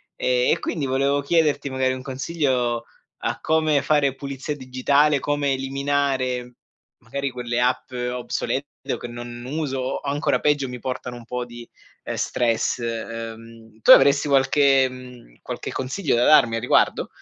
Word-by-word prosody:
e -, -, +1 dB
e, -, -, +2 dB
quindi, 160 Hz, -, -3 dB
volevo 140 Hz, +2 st, +1 dB
chiederti, 145 Hz, -2 st, +1 dB
magari, 130 Hz, -1 st, 0 dB
un 130 Hz, -, -6 dB
consiglio 130 Hz, -4 st, -1 dB, 0.4 s
a -, -, -1 dB
come 155 Hz, -3 st, +2 dB
fare 140 Hz, -1 st, +2 dB
pulizia 140 Hz, +2 st, -5 dB
digitale, 140 Hz, +2 st, +2 dB
come 145 Hz, 0 st, 0 dB
eliminare, 135 Hz, -2 st, -1 dB, 0.5 s
magari, 140 Hz, +3 st, -4 dB
quelle 120 Hz, -1 st, -3 dB
app 125 Hz, +1 st, 0 dB
obsolete 125 Hz, +2 st, -3 dB, 0.2 s
o -, -, -1 dB
che -, -, -7 dB
non 120 Hz, 0 st, -8 dB
uso 140 Hz, -1 st, -3 dB
o, 130 Hz, +1 st, -2 dB
ancora 145 Hz, +1 st, 0 dB
peggio, 145 Hz, -2 st, +1 dB
mi 125 Hz, -1 st, -7 dB
portano 125 Hz, 0 st, -5 dB
un 120 Hz, -, -12 dB
po' 125 Hz, +1 st, -4 dB
di, 120 Hz, -1 st, -11 dB, 0.4 s
uhm, -, -, -3 dB
stress, 115 Hz, 0 st, 0 dB
uhm 115 Hz, -1 st, -7 dB
tu -, -, +6 dB
avresti 140 Hz, +2 st, +7 dB
qualche 135 Hz, -1 st, +4 dB
mhmm, 125 Hz, -, -12 dB
qualche -, -, -6 dB
consiglio 130 Hz, +5 st, -1 dB
da 120 Hz, -, +3 dB
darmi 120 Hz, -7 st, +5 dB
a 115 Hz, -, -1 dB
riguardo? 125 Hz, -, +2 dB
130 Hz, 155 wpm, -23 LUFS, 120-140 Hz, 0.5 s, avresti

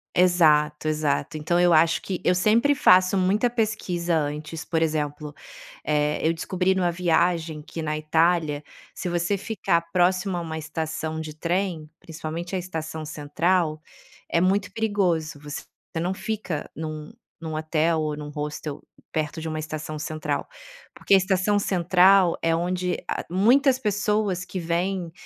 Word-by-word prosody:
Exato, 155 Hz, -4 st, +4 dB
exato. 155 Hz, 0 st, 0 dB
Então 175 Hz, +3 st, 0 dB
eu 175 Hz, 0 st, +4 dB
acho 165 Hz, 0 st, +4 dB
que 185 Hz, -2 st, -4 dB
eu 180 Hz, -, +5 dB
sempre 220 Hz, +10 st, +3 dB
faço 185 Hz, -6 st, +5 dB
muita 195 Hz, +5 st, +2 dB
pesquisa 190 Hz, -7 st, -1 dB
antes 150 Hz, +1 st, -4 dB
por 165 Hz, -2 st, 0 dB
exemplo, 150 Hz, -1 st, -2 dB, 0.5 s
eh, 150 Hz, 0 st, +1 dB
eu 165 Hz, -, +2 dB
descobri 185 Hz, +3 st, 0 dB
numa 180 Hz, -2 st, +1 dB
viagem 165 Hz, -2 st, +1 dB
que 165 Hz, +2 st, -7 dB
na 155 Hz, 0 st, -1 dB
Itália, 155 Hz, -1 st, +1 dB, 0.3 s
se -, -, -5 dB
você 175 Hz, +3 st, 0 dB
ficar 190 Hz, -4 st, 0 dB
próximo 185 Hz, +2 st, +2 dB
a -, -, -2 dB
uma 160 Hz, -1 st, -5 dB
estação 160 Hz, 0 st, -4 dB
de 155 Hz, -1 st, -7 dB
trem, 170 Hz, -1 st, -2 dB
principalmente 165 Hz, +2 st, -6 dB
a -, -, 0 dB
estação 160 Hz, -3 st, -5 dB
central, 155 Hz, +2 st, 0 dB, 0.5 s
é 170 Hz, -, +1 dB
muito 195 Hz, +2 st, +1 dB
perigoso. 180 Hz, -8 st, 0 dB
Você 145 Hz, -1 st, -6 dB
f 160 Hz, -, -10 dB
não 180 Hz, +2 st, -1 dB
fica 195 Hz, -5 st, -4 dB
em 155 Hz, -1 st, -6 dB, 0.3 s
em -, -, -8 dB
um 160 Hz, -, -4 dB
hotel 160 Hz, +1 st, +1 dB
ou 155 Hz, -1 st, -2 dB
em 150 Hz, -, -8 dB
um 150 Hz, -, -6 dB
hostel 150 Hz, 0 st, -5 dB, 0.3 s
perto 155 Hz, 0 st, -2 dB
de 160 Hz, -, -5 dB
uma 155 Hz, 0 st, -3 dB
estação 155 Hz, 0 st, -5 dB
central. 155 Hz, +1 st, -3 dB, 0.5 s
Porque -, -, 0 dB
a -, -, +9 dB
estação 190 Hz, +2 st, +1 dB
central 185 Hz, -1 st, +4 dB
é 165 Hz, 0 st, +2 dB
onde 180 Hz, +2 st, -1 dB
a -, -, -2 dB
muitas 250 Hz, -, +4 dB
pessoas 210 Hz, -4 st, 0 dB
que 185 Hz, +1 st, -5 dB
vêm, 175 Hz, +1 st, -1 dB
170 Hz, 155 wpm, -25 LUFS, 155-185 Hz, 0.5 s, a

